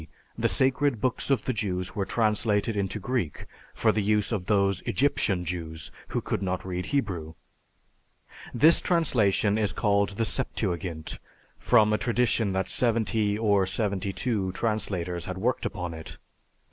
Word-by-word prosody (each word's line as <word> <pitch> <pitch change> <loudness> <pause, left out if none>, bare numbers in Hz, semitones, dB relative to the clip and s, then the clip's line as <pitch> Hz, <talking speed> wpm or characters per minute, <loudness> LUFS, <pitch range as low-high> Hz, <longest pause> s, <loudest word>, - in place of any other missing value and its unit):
the - - +1
sacred 130 -1 +2
books 130 +4 -1
of 135 -6 +2
the 130 - 0
Jews 95 -5 -3
were 100 -2 -1
translated 110 -1 +1
into 100 +1 -1
Greek 110 - -2 0.3
for 110 - +3
the 105 +1 0
use 105 +1 +1
of 95 -5 -2
those 100 -2 +2
Egyptian 100 -10 +1
Jews 80 -2 -5 0.2
who - - -2
could - - -2
not 95 -1 -2
read 90 -1 -4
Hebrew. 90 - -2 1.2
This 155 +8 +5
translation 110 - +2
is 105 -2 +1
called 100 -2 +1
the 115 - +1
Septuagint, 90 - -3 0.4
from 110 -3 +4
a 105 - +1
tradition 120 -3 +1
that 95 0 -1
seventy 110 -3 +1
or 100 -4 +2
seventy 100 -1 -1
two 100 -4 -1
translators 90 -6 -2
had 95 0 -5
worked 115 +6 0
upon 90 -2 -5
it." 80 0 -9
105 Hz, 145 wpm, -27 LUFS, 95-115 Hz, 1.2 s, This